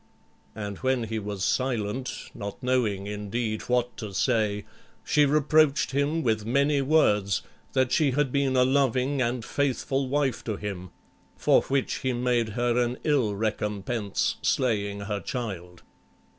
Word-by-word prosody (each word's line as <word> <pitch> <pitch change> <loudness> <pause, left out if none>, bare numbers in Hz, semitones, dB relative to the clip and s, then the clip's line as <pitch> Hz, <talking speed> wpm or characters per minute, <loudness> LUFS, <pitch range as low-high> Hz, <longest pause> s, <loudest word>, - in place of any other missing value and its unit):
And 105 -2 -5
when 130 -2 +1
he 110 0 -3
was 100 -3 -3
silent, 125 -1 -2
not 100 +3 -7
knowing, 115 -6 +1
indeed, 105 +2 -3
what 125 0 +1
to 105 -5 -6
say, 105 -2 +1 0.4
she 150 -1 +3
reproached 150 0 +3
him 145 +4 0
with 110 -3 +1
many 140 +5 +2
words, 105 - +2 0.3
that 130 -1 +2
she 150 0 +3
had 140 0 0
been 140 -1 +1
a 125 - +5
loving 135 0 +2
and 120 -1 -1
faithful 135 -1 -1
wife 140 -2 0
to 110 - -2
him, 95 -3 -6 0.5
for - - +4
which 135 -1 -1
he 130 -1 -1
made 120 -2 +1
her 120 +2 +1
an 120 +1 -2
ill 130 -9 +2
recompense 105 0 -1
slaying 100 -5 0
her 100 0 -3
child. 90 -5 -6
120 Hz, 145 wpm, -26 LUFS, 105-135 Hz, 0.5 s, a